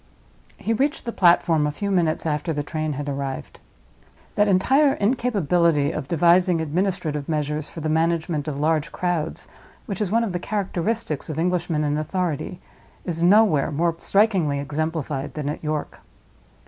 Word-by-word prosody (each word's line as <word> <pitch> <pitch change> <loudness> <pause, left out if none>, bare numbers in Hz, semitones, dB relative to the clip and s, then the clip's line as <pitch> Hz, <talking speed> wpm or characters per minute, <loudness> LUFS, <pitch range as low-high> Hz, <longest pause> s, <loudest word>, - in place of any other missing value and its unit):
He 225 - -1
reached 280 +6 0
the 235 - -2
platform 170 -5 +3
a - - -1
few 200 +7 -3
minutes 170 -5 +1
after 155 +2 -1
the 145 -1 -2
train 155 0 -3
had 145 +1 -5
arrived. 140 -1 -5 0.7
That 205 - +3
entire 265 +10 +4
incapability 175 - +1
of 155 -4 -5
devising 175 +2 +3
administrative 160 -2 -2
measures 150 -1 -2
for 165 - -8
the 155 - -2
management 160 -1 0
of 140 -2 -3
large 155 +1 +1
crowds, 175 -3 -2 0.4
which 200 -1 -4
is 205 - 0
one 230 +3 +2
of 220 - -2
the 175 - -1
characteristics 195 -4 -2
of 155 - -4
Englishmen 170 -2 0
in 150 0 0
authority, 175 +1 -3 0.5
is 165 -2 -3
nowhere 180 -6 +4
more 165 +3 +1
strikingly 195 -9 +2
exemplified 150 -1 -3
than 150 -2 -3
at 150 - -5
York. 155 -1 -3
165 Hz, 155 wpm, -23 LUFS, 150-185 Hz, 0.7 s, entire